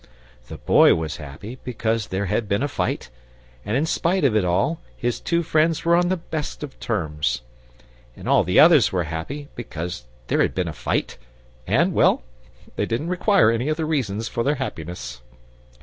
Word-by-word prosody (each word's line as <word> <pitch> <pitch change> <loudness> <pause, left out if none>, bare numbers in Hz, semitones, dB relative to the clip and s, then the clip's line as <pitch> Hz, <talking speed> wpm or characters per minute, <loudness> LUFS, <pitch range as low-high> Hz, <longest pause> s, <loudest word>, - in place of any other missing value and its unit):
The - - -8
Boy - - +5
was 80 -2 -3
happy 85 - -9
because 115 -3 -1
there 95 +2 -2
had 105 +2 -1
been 100 +7 +1
a - - +1
fight, 130 - -3 0.5
and 105 +5 -1
in 150 - +1
spite 170 +2 0
of 130 -6 +3
it 105 - +3
all 90 - 0 0.2
his 120 0 -1
two 170 0 0
friends 160 +1 +1
were 170 0 +5
on 175 0 +2
the 185 - +1
best 155 -3 -5
of 140 -3 -8
terms. 75 - -1 0.7
And - - -9
all - - +4
the 90 +1 +3
others 150 -11 +7
were 90 -2 0
happy 85 - -5
because 85 - -6 0.2
there - - +1
had - - +1
been 90 -2 0
a 80 - -4
fight, 65 - -2 0.5
and 165 - +2
well, - - +3 0.5
they - - 0
didn't 135 +9 -2
require 180 - +4
any 120 +5 -1
other 155 +1 -1
reasons 115 -9 -1
for 115 - -2
their 145 +3 +1
happiness. 85 - -6
115 Hz, 180 wpm, -23 LUFS, -, 0.7 s, others